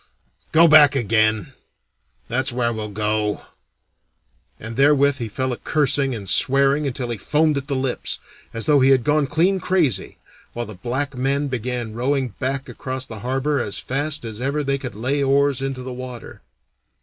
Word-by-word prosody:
Go 165 Hz, +2 st, +6 dB
back 150 Hz, -3 st, +7 dB
again 110 Hz, -4 st, +1 dB, 0.7 s
that's 130 Hz, +3 st, 0 dB
where 120 Hz, -1 st, 0 dB
we'll 110 Hz, -1 st, -5 dB
go!" 105 Hz, 0 st, -1 dB, 1.2 s
and 110 Hz, +1 st, -7 dB
therewith 140 Hz, +1 st, +4 dB
he 115 Hz, -2 st, -4 dB
fell 130 Hz, +4 st, -2 dB
a -, -, -6 dB
cursing 140 Hz, -3 st, +1 dB
and 100 Hz, -3 st, -8 dB
swearing 140 Hz, +6 st, +3 dB
until 125 Hz, -2 st, -3 dB
he 115 Hz, -, -4 dB
foamed 155 Hz, +6 st, +1 dB
at 140 Hz, -1 st, -3 dB
the 140 Hz, -, -1 dB
lips, 130 Hz, -1 st, -2 dB, 0.3 s
as 115 Hz, -1 st, -4 dB
though 145 Hz, -2 st, +4 dB
he 130 Hz, 0 st, +4 dB
had 130 Hz, -3 st, +4 dB
gone 150 Hz, 0 st, +2 dB
clean 175 Hz, +7 st, +2 dB
crazy, 160 Hz, -, 0 dB, 0.4 s
while 120 Hz, 0 st, -4 dB
the 110 Hz, -, -9 dB
black 130 Hz, +9 st, -3 dB
men 140 Hz, +3 st, 0 dB
began 120 Hz, -2 st, -3 dB
rowing 130 Hz, +2 st, 0 dB
back 135 Hz, +1 st, -1 dB
again -, -, -11 dB
across 130 Hz, -1 st, -4 dB
the 110 Hz, -4 st, -9 dB
harbor 135 Hz, +5 st, -1 dB
as 105 Hz, -5 st, -1 dB
fast 145 Hz, +1 st, -2 dB
as 110 Hz, 0 st, -7 dB
ever 140 Hz, +3 st, -1 dB
they 140 Hz, 0 st, -1 dB
could 125 Hz, -6 st, -7 dB
lay 130 Hz, +6 st, -1 dB
oars 140 Hz, -1 st, +2 dB
into 135 Hz, -1 st, -4 dB
the 130 Hz, 0 st, -6 dB
water. 125 Hz, -1 st, -9 dB
130 Hz, 175 wpm, -21 LUFS, 120-140 Hz, 1.2 s, back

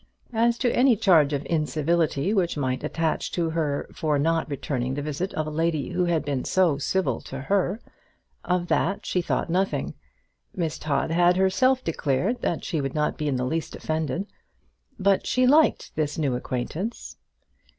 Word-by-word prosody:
As 235 Hz, +1 st, +2 dB
to 245 Hz, -, +1 dB
any 250 Hz, -1 st, +5 dB
charge 175 Hz, -9 st, +4 dB
of 145 Hz, -1 st, -2 dB
incivility 160 Hz, +2 st, 0 dB
which 180 Hz, -6 st, +1 dB
might 130 Hz, -2 st, -1 dB
attach 160 Hz, +1 st, -1 dB
to 165 Hz, -2 st, 0 dB
her 150 Hz, -3 st, -1 dB
for 150 Hz, -2 st, 0 dB
not 165 Hz, +3 st, +1 dB
returning 130 Hz, -2 st, -2 dB
the 145 Hz, -, -3 dB
visit 155 Hz, +6 st, -3 dB
of 155 Hz, -, -1 dB
a 155 Hz, -, -5 dB
lady 160 Hz, -2 st, 0 dB
who 180 Hz, -, 0 dB
had 170 Hz, -3 st, 0 dB
been 140 Hz, -3 st, -1 dB
so 175 Hz, -7 st, +2 dB
civil 190 Hz, +6 st, 0 dB
to 135 Hz, -, -7 dB
her, 195 Hz, +6 st, 0 dB, 0.6 s
of 180 Hz, -1 st, 0 dB
that 195 Hz, +4 st, 0 dB
she 180 Hz, -, 0 dB
thought -, -, -1 dB
nothing. 180 Hz, -6 st, 0 dB, 0.6 s
Miss 165 Hz, -4 st, -2 dB
Todd 150 Hz, +1 st, -1 dB
had 175 Hz, +1 st, +4 dB
herself 255 Hz, +8 st, +3 dB
declared 165 Hz, -, -1 dB
that 170 Hz, -, -1 dB
she 160 Hz, -6 st, -2 dB
would 135 Hz, +1 st, -4 dB
not 150 Hz, 0 st, 0 dB
be 150 Hz, -, -3 dB
in 140 Hz, -, 0 dB
the 125 Hz, 0 st, -1 dB
least 160 Hz, +4 st, -3 dB
offended. 160 Hz, +4 st, -2 dB, 0.7 s
But 195 Hz, -2 st, +2 dB
she 255 Hz, 0 st, +2 dB
liked 300 Hz, +5 st, +3 dB
this 150 Hz, -1 st, -1 dB
new 145 Hz, -5 st, 0 dB
acquaintance. 130 Hz, -, -4 dB
165 Hz, 170 wpm, -25 LUFS, 145-190 Hz, 0.7 s, any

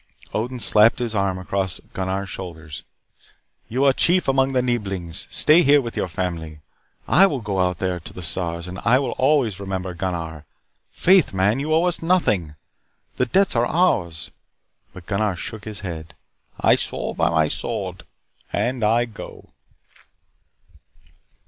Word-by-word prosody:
Odin 125 Hz, +3 st, -2 dB
slapped 110 Hz, 0 st, +4 dB
his 120 Hz, -3 st, -2 dB
arm 100 Hz, -3 st, 0 dB
across 95 Hz, 0 st, -2 dB
Gunnar's 95 Hz, +1 st, -2 dB
shoulders. 80 Hz, -4 st, -8 dB, 0.9 s
"You 130 Hz, +5 st, +1 dB
are 135 Hz, -, +5 dB
chief 180 Hz, +6 st, +2 dB
among 135 Hz, 0 st, +2 dB
the 125 Hz, -1 st, +2 dB
Neeblings. 100 Hz, -7 st, -3 dB
Stay 155 Hz, +3 st, +5 dB
here 145 Hz, -1 st, +5 dB
with 120 Hz, -4 st, -5 dB
your -, -, -1 dB
family. 80 Hz, -3 st, -4 dB, 0.5 s
I 195 Hz, +4 st, +6 dB
will 145 Hz, -7 st, -2 dB
go 100 Hz, -4 st, -3 dB
out 90 Hz, -1 st, +1 dB
there 90 Hz, -1 st, -2 dB
to 85 Hz, -, -10 dB
the 90 Hz, -, -9 dB
stars, 85 Hz, 0 st, -3 dB
and 90 Hz, 0 st, -7 dB
I 120 Hz, +2 st, +4 dB
will 135 Hz, -1 st, -1 dB
always 130 Hz, -8 st, +2 dB
remember 95 Hz, -2 st, -4 dB
Gunnar. 85 Hz, -4 st, -4 dB, 0.4 s
Faith, 185 Hz, -, +3 dB
man, 100 Hz, +6 st, +2 dB
you 150 Hz, +3 st, -3 dB
owe 160 Hz, +2 st, +4 dB
us 180 Hz, -1 st, 0 dB
nothing. 105 Hz, -, +1 dB, 0.6 s
The 125 Hz, -, +1 dB
debts 195 Hz, +6 st, +2 dB
are 120 Hz, +1 st, +2 dB
ours 85 Hz, -, 0 dB, 0.3 s
" -, -, -47 dB
But 90 Hz, -, -11 dB
Gunnar 100 Hz, 0 st, 0 dB
shook 100 Hz, +4 st, -7 dB
his 105 Hz, -1 st, -7 dB
head. 85 Hz, -4 st, -7 dB, 0.4 s
"I -, -, +4 dB
swore -, -, -3 dB
by -, -, +1 dB
my 80 Hz, -2 st, +2 dB
sword. -, -, -4 dB, 0.5 s
And 125 Hz, -1 st, -1 dB
I 115 Hz, +3 st, +3 dB
go." 115 Hz, -3 st, -11 dB
100 Hz, 155 wpm, -22 LUFS, 90-130 Hz, 0.9 s, I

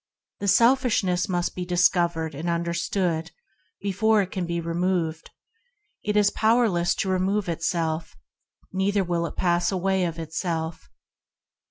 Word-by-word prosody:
Selfishness 210 Hz, -3 st, +3 dB
must 175 Hz, -1 st, -1 dB
be 180 Hz, -, -4 dB
dis 180 Hz, 0 st, +4 dB
covered 170 Hz, -3 st, -1 dB
and 160 Hz, +5 st, -4 dB
understood 170 Hz, 0 st, -1 dB, 0.5 s
before 205 Hz, +2 st, +2 dB
it 190 Hz, -, -8 dB
can 180 Hz, -2 st, -3 dB
be 170 Hz, 0 st, -2 dB
removed. 170 Hz, -1 st, -1 dB, 0.7 s
It 210 Hz, 0 st, 0 dB
is 205 Hz, -1 st, +4 dB
powerless 220 Hz, -6 st, +2 dB
to 190 Hz, -, -2 dB
remove 190 Hz, +2 st, 0 dB
itself, 165 Hz, -1 st, -2 dB, 0.6 s
neither 195 Hz, +1 st, +1 dB
will 170 Hz, -1 st, -1 dB
it -, -, -9 dB
pass 175 Hz, 0 st, +1 dB
away 190 Hz, 0 st, +1 dB
of 165 Hz, -1 st, -4 dB
itself. 160 Hz, 0 st, -4 dB
180 Hz, 130 wpm, -25 LUFS, 170-195 Hz, 0.7 s, dis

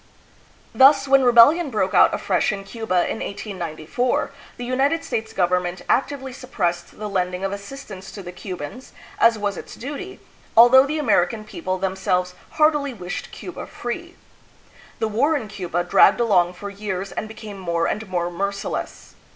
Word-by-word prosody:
Thus, 270 Hz, +1 st, +6 dB
when 270 Hz, 0 st, +5 dB
rebellion 255 Hz, +7 st, +6 dB
broke 205 Hz, -5 st, -1 dB
out 180 Hz, -, +6 dB
afresh -, -, 0 dB
in 200 Hz, -1 st, -5 dB
Cuba 195 Hz, -4 st, -1 dB
in -, -, -3 dB
1894, 195 Hz, +2 st, -3 dB, 0.3 s
the 245 Hz, -, -5 dB
United 275 Hz, +6 st, +1 dB
States 220 Hz, 0 st, -3 dB
government 180 Hz, -2 st, 0 dB
actively 270 Hz, -1 st, 0 dB
suppressed 175 Hz, -10 st, -3 dB
the 215 Hz, -, -5 dB
lending 180 Hz, -2 st, -2 dB
of 195 Hz, -, -1 dB
assistance 200 Hz, -2 st, -8 dB
to 200 Hz, -, -8 dB
the 180 Hz, -, -7 dB
Cubans, 185 Hz, -, -8 dB, 0.3 s
as 230 Hz, -1 st, +5 dB
was 205 Hz, -3 st, -2 dB
its -, -, -9 dB
duty, 295 Hz, +9 st, -7 dB, 0.4 s
al 235 Hz, +2 st, +9 dB
though 260 Hz, +2 st, +7 dB
the 305 Hz, +2 st, -2 dB
American 215 Hz, -, +1 dB
people 185 Hz, -3 st, -4 dB
themselves 185 Hz, -1 st, -1 dB, 0.2 s
heartily 295 Hz, -4 st, +2 dB
wished 180 Hz, -3 st, -6 dB
Cuba -, -, -8 dB
free. 340 Hz, +9 st, -6 dB, 0.8 s
The 220 Hz, -, -1 dB
war 265 Hz, +9 st, +2 dB
in 225 Hz, -, -6 dB
Cuba 180 Hz, -4 st, -3 dB
dragged 180 Hz, -, +5 dB
along 185 Hz, -7 st, +3 dB
for 200 Hz, +3 st, -7 dB
years 195 Hz, -1 st, -4 dB
and 215 Hz, -, -4 dB
became 215 Hz, -2 st, -9 dB
more 170 Hz, -2 st, -1 dB
and 215 Hz, -2 st, -3 dB
more 175 Hz, -1 st, -1 dB
merciless. 200 Hz, +3 st, -4 dB
205 Hz, 160 wpm, -22 LUFS, 185-255 Hz, 0.8 s, al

